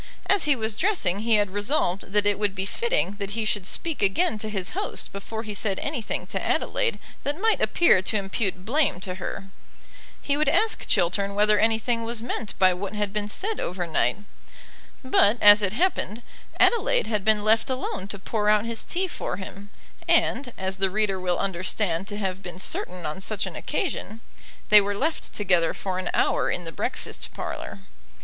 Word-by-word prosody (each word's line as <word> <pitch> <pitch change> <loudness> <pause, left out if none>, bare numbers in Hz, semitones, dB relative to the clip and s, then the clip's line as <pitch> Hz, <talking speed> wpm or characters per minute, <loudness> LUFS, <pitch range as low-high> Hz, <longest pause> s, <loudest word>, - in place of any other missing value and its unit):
As 400 - +3
he 295 -2 +4
was 220 -3 -2
dressing 215 - +1
he 225 +1 +2
had 205 -2 +2
resolved 205 -3 -1
that 205 0 +2
it 205 -1 +2
would 205 -2 0
be 190 0 -2
fitting 470 - -1
that 200 +2 -4
he 225 - 0
should 205 -3 -1
speak 330 -7 -1
again 215 - +2
to 215 - -4
his 190 -4 -3
host - - -4
before 220 +3 -6
he 215 -2 -6
said 200 -1 -2
anything 285 -7 -3
to - - -4
Adelaide - - 0 0.2
that 290 +4 -3
might 445 +2 +2
appear 340 - +4
to 215 +3 +1
impute 195 -1 -2
blame 280 - +1
to 185 -1 -4
her. 195 - -5 0.7
He 285 - 0
would 305 - +2
ask 445 0 +1
Chiltern 195 +3 +2
whether 210 0 +4
anything 225 +1 +1
was 230 0 -3
meant 235 -3 -4
by 185 -1 +5
what 195 +3 -5
had 205 -1 -2
been 210 -1 -2
said 420 - -3
over 180 0 -2
night. 160 - +1 0.9
But, 240 -4 +4
as 205 0 +8
it 200 -1 0
happened, 240 - -1 0.4
Adelaide - - +3
had 210 -3 -1
been 215 0 +3
left 220 +3 +3
alone 255 -7 -3
to 200 - -4
pour 210 +2 -1
out 210 +1 +4
his 230 -1 -2
tea 370 +2 -2
for 180 - -4
him, 200 +1 -9 0.4
and, 250 0 +2
as 190 0 -2
the 195 0 +2
reader 200 -1 0
will 180 -1 0
understand 185 -1 -1
to 205 - -5
have 190 -2 -3
been 180 -2 -8
certain 180 -2 -3
on 155 +5 -4
such 210 +1 -1
an - - -7
occasion, 230 - -3 0.5
they 210 0 +9
were 200 0 -2
left 315 +7 -2
together 180 -5 +2
for 185 -1 -3
an 185 - -2
hour - - +2
in 180 - -2
the 165 - -6
breakfast - - -4
parlour. 100 - -6
210 Hz, 190 wpm, -25 LUFS, 190-230 Hz, 0.9 s, they